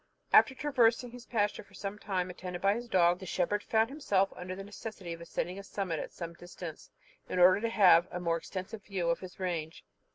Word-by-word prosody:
After 265 - +7
traversing 245 -4 +2
his 245 0 -11
pasture 210 -3 0
for 200 -1 -19
some 200 +1 -5
time, 185 -4 -2
attended 180 0 -6
by 195 +2 +3
his 240 +2 -5
dog, 175 -2 +4
the 190 - -8
shepherd 190 +4 0
found 220 +3 +1
himself 200 -10 +1
under 180 +1 -6
the 195 - -7
necessity 200 -3 -7
of 165 - -9
ascending 180 +2 -3
a - - -8
summit 190 -5 -3
at - - -5
some 170 -1 -6
distance, 175 -2 -9 0.4
in - - -2
order 185 +2 +6
to 230 - 0
have 185 -6 +6
a 180 - -4
more 170 -1 +1
extensive 190 +5 -7
view 180 -4 -1
of 170 - -1
his 185 -1 -10
range. 165 -4 -3
190 Hz, 215 wpm, -31 LUFS, 175-210 Hz, 0.4 s, After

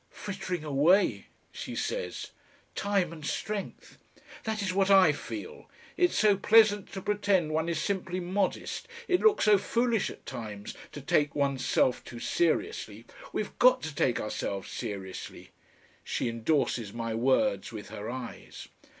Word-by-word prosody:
"Frittering 190 -4 -5
away," 155 +7 +3 0.2
she - - -6
says, - - -3 0.4
"time 195 -5 0
and 155 -2 -10
strength." 205 +6 -4 0.5
"That 220 -1 -1
is 185 -2 -1
what 195 0 +2
I 190 -5 +7
feel. 325 - -7 0.3
It's 355 0 +2
so 210 -2 +5
pleasant 210 -1 +5
to 190 -1 -5
pretend 200 -6 +1
one 160 +2 0
is 165 -2 -1
simply 185 0 -2
modest, 190 - -2 0.2
it 360 -1 +2
looks 435 -1 +4
so 210 -2 +6
foolish 235 0 +1
at - - -12
times 105 -3 -6 0.2
to 145 - -7
take 145 +1 +1
one's 140 -2 0
self 125 - +2
too 120 - -9
seriously. 115 -8 -1 0.3
We've 210 - -3
GOT 255 +1 +6
to 160 - -4
take 130 -4 +1
ourselves 100 -2 -4
seriously." 95 -2 -6 0.5
She - - -2
endorses 115 -2 0
my 115 -1 -3
words 130 - +1
with 110 -2 -8
her 105 +2 -6
eyes. 125 -1 -8
175 Hz, 145 wpm, -29 LUFS, 130-205 Hz, 0.5 s, I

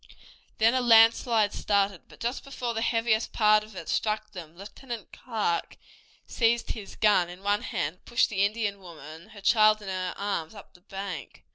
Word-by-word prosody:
Then 225 +2 +4
a 260 - +1
landslide 225 -2 +5
started, 200 -3 0
but - - -17
just 240 +3 -3
before 250 -4 -4
the 225 - -3
heaviest 230 -1 0
part 215 -1 +4
of 215 -1 -14
it 165 - -8
struck 215 0 -1
them 170 -4 -10
Lieutenant 230 +4 -9
Clark 215 -8 -2 0.5
seized 235 0 +1
his 210 -3 -8
gun 200 -5 +3
in 180 +2 -11
one 205 +1 +1
hand, 155 +5 -3
and - - -39
pushed 240 - +2
the 200 -2 0
Indian 205 -1 -1
woman, 160 -2 -12
her 205 - -13
child 215 +1 +4
in 205 -2 -8
her 185 -1 -3
arms, 200 -3 -3
up 205 - -13
the 180 - -20
bank. 195 - -7
210 Hz, 180 wpm, -27 LUFS, 190-225 Hz, 0.5 s, landslide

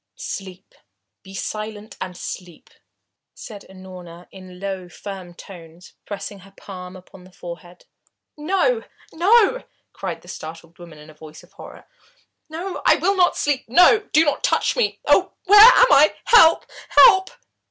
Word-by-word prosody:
"Sleep 195 - -9 0.5
be 195 0 -14
silent 215 +1 -7
and 180 -1 -7
sleep!" 180 -3 -10 0.6
said 210 -4 -12
Unorna 180 -2 -13
in 185 -1 -14
low, 190 -2 -6
firm 185 -2 -10
tones, 170 -2 -15
pressing 200 0 -8
her 195 +1 -19
palm 180 -2 -11
upon 185 0 -16
the 185 - -18
forehead. 175 0 -12 0.5
"No 390 +10 -1 0.3
no!" 425 +7 +2 0.3
cried - - -7
the - - -19
startled 165 +2 -11
woman 170 -3 -14
in 150 +1 -15
a - - -19
voice 155 +1 -15
of 175 - -22
horror. - - -14 0.6
"No 350 +4 -7
I - - +4
will 395 +2 -1
not 360 -2 +1
sleep 285 -3 -2
no, 355 - +5
do 315 +2 +3
not 290 - -2
touch - - 0
me! 470 -4 -2
Oh, - - +2
where 410 +2 +6
am - - +7
I 295 +2 +4
help! 330 -9 +5 0.2
Help!" 380 -6 +5
195 Hz, 150 wpm, -20 LUFS, -, 0.6 s, am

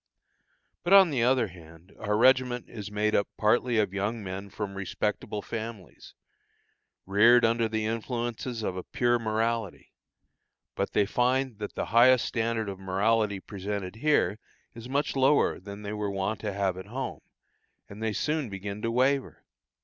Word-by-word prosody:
But 175 - +2
on 190 -4 +8
the 130 -4 0
other 125 -2 +3
hand, 85 0 -15
our 105 -1 0
regiment 125 0 +3
is 105 -3 -7
made 105 +1 0
up 100 - +2
partly 120 +2 +2
of 105 -3 +1
young 105 +3 -2
men 95 +1 -6
from 100 -1 -5
respectable 100 +1 -3
families, 110 -4 -8 0.9
reared 115 +5 +5
under 115 0 +1
the 110 -1 -1
influences 115 +1 -3
of 95 - -2
a 90 - -4
pure 120 -1 +1
morality; 110 -2 -2 0.8
but - - -3
they 105 - +3
find 125 +1 0
that 105 - -6
the - - -2
highest 125 +1 +6
standard 115 -2 -1
of 95 -1 -6
morality 100 +2 +1
presented 100 0 -5
here 115 -8 +2 0.3
is 115 +2 -10
much 140 +2 0
lower 135 +2 +3
than 100 +2 -9
they 100 +1 -4
were 105 -1 -2
wont 100 +2 -2
to 105 - -3
have 95 -2 -1
at 95 +1 -8
home, 130 +5 -5 0.7
and 100 +2 -11
they 110 -1 0
soon 150 +3 -1
begin 100 +1 -6
to 115 - -1
waver. 130 +3 0
110 Hz, 160 wpm, -28 LUFS, 100-120 Hz, 0.9 s, on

